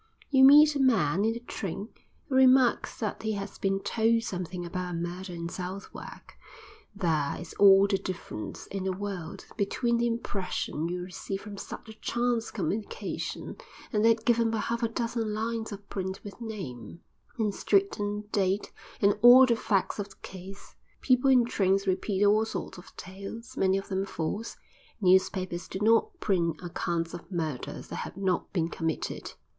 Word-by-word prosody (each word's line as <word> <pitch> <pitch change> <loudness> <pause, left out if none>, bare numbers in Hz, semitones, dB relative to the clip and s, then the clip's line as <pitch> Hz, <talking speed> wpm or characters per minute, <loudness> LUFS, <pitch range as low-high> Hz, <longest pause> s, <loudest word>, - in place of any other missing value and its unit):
You 265 -1 +6
meet 295 +2 +8
a - - 0
man 200 - +3
in 225 - +2
the 235 - -5
train 205 -2 -5 0.4
who 275 - -5
remarks 260 -1 +4
that 215 -3 -3
he 220 0 -1
has 200 0 -6
been 195 0 0
told 230 +2 +2
something 180 -3 -4
about 180 0 -4
a - - -2
murder 175 +2 -5
in 170 -1 -5
Southwark; 185 +3 -8 0.6
there 160 -7 0
is 175 - -9
all 195 -1 +8
the 200 -1 +1
difference 175 - -6
in 195 -1 -5
the 190 - +1
world 190 -4 -6
between 235 +3 +1
the 240 0 +2
impression 190 -8 -2
you 180 0 -3
receive 195 +2 -5
from 210 -2 -8
such 200 - -8
a 220 - -9
chance 240 +1 -1
communication 205 +2 -4 0.4
and 210 -1 +2
that 225 0 +3
given 235 -1 +3
by 225 - -1
half 230 +2 -2
a 230 - +2
dozen 230 -2 -2
lines 225 +1 -2
of 205 0 -9
print 190 0 -4
with 205 +3 -10
name, 175 - -7 0.4
and 215 -3 0
street 200 0 +1
and 205 +1 -3
date 195 0 0 0.3
and 205 +1 +3
all 250 +2 +10
the 240 -2 +2
facts 200 -2 0
of 200 0 -3
the 195 - -16
case. 190 +1 -10 0.3
People 255 +1 +3
in 250 -3 +6
trains 195 -3 +1
repeat 195 +1 +1
all 210 +2 +5
sorts 220 - -5
of 180 - -16
tales, 195 +5 -8
many 190 0 +2
of 195 - -6
them 195 0 -1
false; 195 +7 -4 0.4
newspapers 185 -2 +2
do - - -5
not 230 - +3
print 170 - +1
accounts 170 -1 -2
of 175 +3 -9
murders 160 -7 -4
that - - -5
have - - -6
not 190 -3 -1
been 165 -4 0
committed. 165 -1 -3
200 Hz, 170 wpm, -28 LUFS, 185-225 Hz, 0.6 s, all